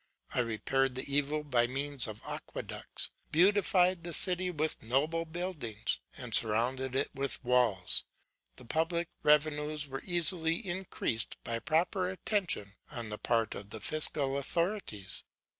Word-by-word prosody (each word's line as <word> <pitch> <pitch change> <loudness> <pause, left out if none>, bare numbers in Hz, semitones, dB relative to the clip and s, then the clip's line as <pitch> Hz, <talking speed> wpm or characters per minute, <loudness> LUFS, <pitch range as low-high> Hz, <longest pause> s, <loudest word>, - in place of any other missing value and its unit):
I - - +1
repaired 125 +3 +1
the 130 - -2
evil 145 +2 +1
by 125 -5 +2
means 140 +1 +1
of 110 -1 -8
aqueducts, - - -5 0.2
beautified 185 0 +4
the 170 0 -4
city 185 -1 +2
with 155 -2 -1
noble 150 +8 +1
buildings, 160 - -3 0.2
and 125 -3 -5
surrounded 125 +4 +3
it - - 0
with 135 0 -2
walls. 120 -7 +2 0.5
The - - -14
public 165 +5 0
revenues 150 0 +2
were 135 -1 -5
easily 170 -2 +2
increased 185 - -3
by 115 0 -1
proper 175 - +1
attention 180 - -1 0.2
on 115 -2 -5
the 105 - -5
part 115 -2 +1
of 100 0 -7
the 110 - -5
fiscal 140 +1 +1
authorities. 170 - -1
145 Hz, 135 wpm, -32 LUFS, 120-170 Hz, 0.5 s, beautified